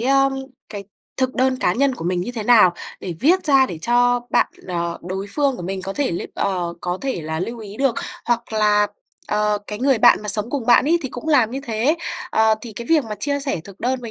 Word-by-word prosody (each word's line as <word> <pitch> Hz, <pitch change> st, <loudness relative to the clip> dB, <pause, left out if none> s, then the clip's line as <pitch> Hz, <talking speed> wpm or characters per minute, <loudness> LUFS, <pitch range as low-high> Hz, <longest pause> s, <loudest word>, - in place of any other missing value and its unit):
ưm, 275 Hz, +2 st, +3 dB, 0.4 s
cái 205 Hz, -2 st, -7 dB, 0.3 s
thực 260 Hz, -1 st, 0 dB
đơn 260 Hz, 0 st, +2 dB
cá 180 Hz, -, +1 dB
nhân 270 Hz, +5 st, +1 dB
của 205 Hz, -, -8 dB
mình 180 Hz, 0 st, 0 dB
như 205 Hz, +7 st, -4 dB
thế 225 Hz, -3 st, -4 dB
nào 210 Hz, -6 st, +6 dB, 0.3 s
để 180 Hz, -, -5 dB
viết 360 Hz, +5 st, +3 dB
ra 270 Hz, -3 st, +5 dB
để 170 Hz, -, -7 dB
cho 245 Hz, 0 st, +3 dB
bạn, -, -, +3 dB, 0.2 s
ờ, 170 Hz, -1 st, -2 dB
đối 190 Hz, +3 st, -4 dB
phương 280 Hz, -3 st, +1 dB
của -, -, -7 dB
mình 190 Hz, +1 st, -4 dB
có 195 Hz, +1 st, -4 dB
thể 285 Hz, +2 st, -1 dB
lưu 170 Hz, -, -3 dB
ờ, 180 Hz, -3 st, -1 dB
có 180 Hz, +1 st, -3 dB
thể 265 Hz, -9 st, -2 dB
là 160 Hz, +1 st, -3 dB
lưu 230 Hz, +6 st, -4 dB
ý 210 Hz, -2 st, -9 dB
được. 270 Hz, -2 st, +1 dB, 0.3 s
Hoặc 235 Hz, -1 st, -1 dB
là, 210 Hz, -1 st, +3 dB, 0.4 s
ờ, 210 Hz, 0 st, +1 dB
cái 210 Hz, -, -5 dB
người 265 Hz, -1 st, +2 dB
bạn 240 Hz, -1 st, +5 dB
mà 210 Hz, -, -7 dB
sống 210 Hz, +3 st, -2 dB
cùng 265 Hz, -5 st, -3 dB
bạn 240 Hz, -, +6 dB
ấy 335 Hz, +4 st, +3 dB
thì 265 Hz, -, -3 dB
cũng 250 Hz, +6 st, -7 dB
làm 255 Hz, -8 st, +4 dB
như 270 Hz, +3 st, -4 dB
thế, 235 Hz, +8 st, +1 dB, 0.3 s
ờ, 220 Hz, 0 st, +4 dB
thì 230 Hz, -1 st, -8 dB
cái 235 Hz, +3 st, -7 dB
việc 315 Hz, -5 st, +3 dB
mà 215 Hz, -, -5 dB
chia 285 Hz, +2 st, -1 dB
sẻ 275 Hz, -, -2 dB
thực 200 Hz, -1 st, -13 dB
đơn 255 Hz, +1 st, -1 dB
với 235 Hz, -2 st, -7 dB
230 Hz, 245 wpm, -21 LUFS, 200-265 Hz, 0.4 s, nào